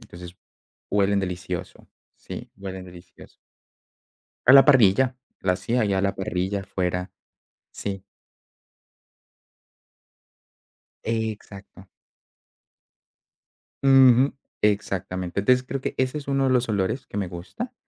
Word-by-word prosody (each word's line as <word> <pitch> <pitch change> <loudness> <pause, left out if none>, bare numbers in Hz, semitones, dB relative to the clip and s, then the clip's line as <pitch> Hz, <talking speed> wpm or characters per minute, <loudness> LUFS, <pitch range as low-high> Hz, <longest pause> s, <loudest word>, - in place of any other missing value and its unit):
Entonces 90 0 -12 0.6
huelen 100 0 +2
delicioso. 90 -2 -5 0.3
Sí, - - -9
huelen 95 -1 -7
delicioso. 90 -1 -15 1.1
A 130 - +9
la 135 - +9
parrilla. 130 -1 +5 0.3
La 90 -1 +2
hace 115 +6 -2
ahí 105 -3 +1
a 95 - +1
la 100 0 0
parrilla, 95 +1 -2
afuera 90 -1 -3 0.6
Sí. 100 -1 -5 3.0
Exacto. 105 -4 -5 2.0
Ujú. 135 -1 +6 0.3
Exactamente. 95 -3 -1
Entonces 125 +5 +3
creo 135 0 -4
que - - -4
ese 130 +3 0
es 140 - -8
uno 135 -1 +1
de 130 - +2
los 125 -1 +1
olores 105 +6 -1
que 105 - -7
me 95 -3 -1
gusta. 100 - -7
100 Hz, 105 wpm, -24 LUFS, 95-125 Hz, 3.0 s, A